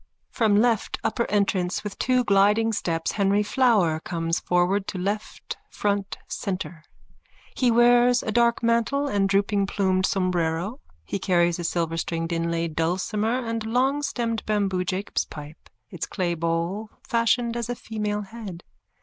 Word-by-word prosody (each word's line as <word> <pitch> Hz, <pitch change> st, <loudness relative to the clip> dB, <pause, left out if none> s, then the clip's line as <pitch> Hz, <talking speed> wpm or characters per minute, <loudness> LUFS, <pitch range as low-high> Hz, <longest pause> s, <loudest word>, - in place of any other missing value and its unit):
_(From 215 Hz, -3 st, +3 dB
left 230 Hz, -1 st, +2 dB
upper 235 Hz, +1 st, -1 dB
entrance 195 Hz, -2 st, 0 dB
with 210 Hz, -2 st, -6 dB
two 255 Hz, 0 st, +2 dB
gliding 210 Hz, +2 st, +3 dB
steps 165 Hz, -5 st, -1 dB
Henry 200 Hz, 0 st, +2 dB
Flower 210 Hz, -, +3 dB
comes 165 Hz, 0 st, -2 dB
forward 180 Hz, +3 st, +1 dB
to -, -, -4 dB
left 205 Hz, +4 st, -4 dB
front 200 Hz, -1 st, -1 dB
centre. 180 Hz, -4 st, -4 dB, 0.7 s
He 255 Hz, -, +2 dB
wears 240 Hz, +1 st, +5 dB
a 220 Hz, -, -2 dB
dark 235 Hz, +1 st, +2 dB
mantle 235 Hz, +5 st, +1 dB
and 200 Hz, -6 st, +1 dB
drooping 200 Hz, 0 st, +2 dB
plumed 190 Hz, -1 st, +1 dB
sombrero. 180 Hz, -, -1 dB, 0.3 s
He 200 Hz, -, -3 dB
carries 175 Hz, -2 st, +2 dB
a -, -, -3 dB
silverstringed 165 Hz, 0 st, -2 dB
inlaid 165 Hz, -1 st, -1 dB
dulcimer 210 Hz, +9 st, 0 dB
and 230 Hz, -1 st, -2 dB
a 220 Hz, -, -5 dB
longstemmed 250 Hz, -2 st, 0 dB
bamboo 195 Hz, -4 st, 0 dB
Jacob's 190 Hz, +3 st, -2 dB
pipe, 150 Hz, +1 st, -11 dB, 0.2 s
its 175 Hz, -4 st, -4 dB
clay 180 Hz, -3 st, -1 dB
bowl 170 Hz, +6 st, -2 dB, 0.2 s
fashioned 235 Hz, 0 st, +1 dB
as 235 Hz, 0 st, -3 dB
a 245 Hz, -, -1 dB
female 210 Hz, -2 st, -3 dB
head. 200 Hz, -4 st, -9 dB
200 Hz, 140 wpm, -25 LUFS, 175-230 Hz, 0.7 s, wears